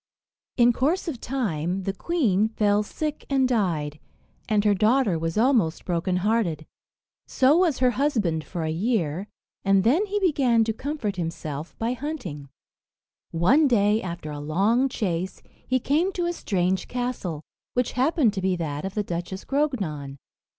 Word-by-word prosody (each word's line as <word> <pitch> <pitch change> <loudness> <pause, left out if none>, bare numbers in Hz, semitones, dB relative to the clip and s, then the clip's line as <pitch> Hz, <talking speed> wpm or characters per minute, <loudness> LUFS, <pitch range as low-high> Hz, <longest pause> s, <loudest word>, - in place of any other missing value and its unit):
In 240 -1 +5
course 315 +10 0
of 270 -8 -4
time 190 - -2
the 195 - -2
queen 220 - +1
fell 210 -2 +2
sick 300 +8 -4
and 270 -2 +3
died, 165 - -1 0.5
and 210 -1 +2
her 205 - +5
daughter 215 -3 +2
was 165 +2 -2
almost 220 -9 +2
broken 180 +1 0
hearted. 190 -9 0 0.6
So 265 +3 +4
was 345 -6 +3
her 250 -1 +3
husband 220 - 0
for 170 0 -5
a 160 - -1
year, 185 -1 -1 0.4
and 195 -1 +3
then 320 - +3
he 410 +1 -1
began 270 - +3
to 225 0 -1
comfort 230 -6 -3
himself 160 -2 -5
by 230 +2 -1
hunting. 235 - -6 0.8
One 250 - +4
day, 215 -3 +3
after 170 -4 -6
a 145 - -6
long 200 - +2
chase, 185 -6 -3 0.2
he 255 0 +2
came 310 +10 +1
to 350 -1 -1
a 345 - 0
strange 190 - -1
castle, 245 -11 -3 0.3
which 250 -1 +1
happened 260 -3 +2
to 195 - -3
be 185 0 +1
that 155 -2 -4
of 195 - -5
the 210 - 0
Duchess 175 +1 -5
Grognon. 195 - -2
210 Hz, 155 wpm, -25 LUFS, 175-260 Hz, 0.8 s, In